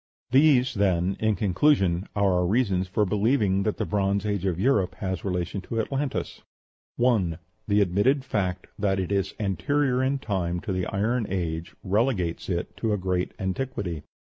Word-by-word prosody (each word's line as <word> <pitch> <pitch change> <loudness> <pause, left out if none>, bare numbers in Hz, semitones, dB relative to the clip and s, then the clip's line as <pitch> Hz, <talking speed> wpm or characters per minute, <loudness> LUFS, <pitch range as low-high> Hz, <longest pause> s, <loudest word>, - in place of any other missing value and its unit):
| - - -
+ - - -
+ - - -
+ - - -42
These, 130 -2 +5
then, 95 -3 +1
in 110 -1 +2
conclusion, 95 - +2
are 100 -2 +3
our 90 0 +2
reasons 100 -4 +1
for 105 +3 +1
believing 105 -1 +2
that 105 +1 -1
the - - -1
Bronze 100 0 0
Age 100 -2 -1
of 90 -2 -1
Europe 105 -5 +2
has 95 -2 -4
relation 90 +1 -2
to 115 +4 -4
Atlantis: 135 +4 -2 0.5
1. 105 -10 +2 0.3
The 105 0 +3
admitted 105 +9 +2
fact 95 -6 -2
that 95 -2 +1
it 95 0 -3
is 100 -1 0
anterior 130 +6 +1
in 135 +2 +1
time 95 -9 -2
to 110 - -4
the 90 -1 -1
Iron 110 +3 0
Age 85 -3 -3
relegates 100 -4 0
it 85 -1 -3
to 110 -2 0
a - - +1
great 90 -1 -1
antiquity. 95 - -3
100 Hz, 180 wpm, -26 LUFS, 90-115 Hz, 0.5 s, These